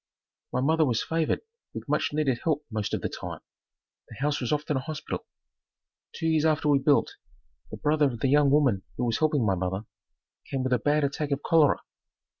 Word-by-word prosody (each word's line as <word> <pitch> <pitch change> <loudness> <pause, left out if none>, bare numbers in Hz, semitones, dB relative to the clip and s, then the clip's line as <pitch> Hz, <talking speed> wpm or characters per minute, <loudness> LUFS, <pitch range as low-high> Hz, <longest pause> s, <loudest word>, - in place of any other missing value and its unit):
My 125 - 0
mother 160 +4 +3
was 120 -6 +1
favored 160 -1 0 0.3
with - - -6
much - - 0
needed 145 -5 0
help 150 -2 0
most 110 -2 -2
of - - -4
the - - +1
time. - - -7 0.7
The - - -10
house 145 +4 -1
was 125 - -2
often 150 0 0
a - - +1
hospital. 150 +3 -5 0.8
Two - - -6
years 160 -2 +2
after 155 -1 +2
we 140 -1 +5
built, 140 +1 +2 0.5
the - - -7
brother 150 0 +2
of 120 -4 -5
the - - +2
young 145 +1 +4
woman 135 -9 +3 0.2
who 125 - 0
was 115 -2 0
helping 150 -6 +2
my 100 - +2
mother, 95 +3 -2 0.6
came 135 -1 -2
with 130 0 0
a 125 - +3
bad 150 +4 +2
attack 140 +1 -1
of 140 0 -2
cholera. 160 -3 +4
145 Hz, 200 wpm, -27 LUFS, 125-150 Hz, 0.8 s, we